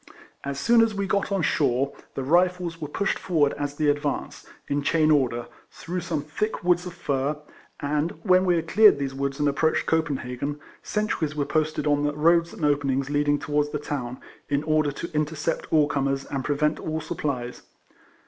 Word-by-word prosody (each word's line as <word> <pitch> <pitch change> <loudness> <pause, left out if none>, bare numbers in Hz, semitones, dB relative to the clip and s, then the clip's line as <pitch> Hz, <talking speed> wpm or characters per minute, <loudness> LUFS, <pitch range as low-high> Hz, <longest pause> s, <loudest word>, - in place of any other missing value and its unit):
As 140 0 -4
soon 235 +5 +5
as 225 -2 +2
we 200 0 -1
got 200 +1 0
on 195 -3 +1
shore, 135 -2 +1 0.2
the 135 - -2
Rifles 175 +2 +1
were 150 - -3
pushed 195 +7 -1
forward 155 -6 +2
as 145 0 -4
the 150 0 0
advance, 145 0 -2 0.2
in 145 +1 0
chain 155 +1 +3
order, 125 -5 +2 0.2
through 180 +2 -5
some 160 -4 -3
thick 210 +9 -3
woods 180 0 +2
of 175 - -8
fir, 140 +2 -1 0.4
and 150 +3 0
when 185 -2 +5
we 180 -2 +3
had 165 -1 -2
cleared 210 +1 +6
these 140 -1 -3
woods 140 +1 -3
and 145 - +2
ap 140 0 0
proached 160 0 +2
Copenhagen, 145 -3 -1 0.2
sentries 180 -8 -1
were 145 -1 0
posted 155 -1 0
on 145 -1 +2
the 145 0 0
roads 170 +2 +3
and 155 - -3
openings 140 -1 +1
leading 145 0 +2
towards 150 0 0
the 150 - -2
town, 130 -4 -4 0.3
in 145 0 +1
order 155 -1 +2
to 170 +4 -7
intercept 150 +1 -2
all 155 -2 +5
comers, 135 -1 -1
and 135 -2 -4
prevent 150 +2 0
all 160 0 -3
supplies. 140 -8 -4
150 Hz, 185 wpm, -25 LUFS, 140-165 Hz, 0.4 s, cleared